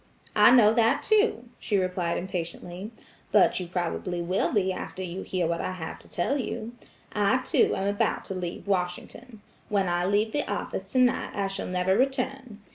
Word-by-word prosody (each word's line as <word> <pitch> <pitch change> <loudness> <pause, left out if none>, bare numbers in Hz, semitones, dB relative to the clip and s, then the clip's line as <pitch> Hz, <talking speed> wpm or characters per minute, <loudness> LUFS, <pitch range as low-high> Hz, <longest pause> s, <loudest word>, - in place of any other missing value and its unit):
"I - - +7
know 230 -4 +6
that, 230 0 +3
too," 425 - +2
she 205 - 0
replied 180 -2 -1
impatiently, 180 +1 -5 0.4
"but - - +4
you 180 - -5
probably 175 0 -2
will 180 +3 0
be 190 -3 +1
after 185 0 -6
you 180 +1 -5
hear 180 -2 -1
what 170 +1 -1
I 185 - -3
have 160 -3 -6
to - - -15
tell 275 +11 0
you. 235 -2 -4 0.4
I, 205 +3 +3
too, - - +3
am 195 - -1
about 205 0 0
to - - -5
leave 180 -2 -5
Washington. 200 +5 -3 0.3
When 200 -2 +1
I 175 0 0
leave 210 +2 +2
the 290 - -2
office - - -4
tonight 255 -2 +2
I 200 -1 0
shall 195 0 -4
never 180 +1 +1
return. 260 -2 -1
195 Hz, 180 wpm, -27 LUFS, 180-225 Hz, 0.4 s, I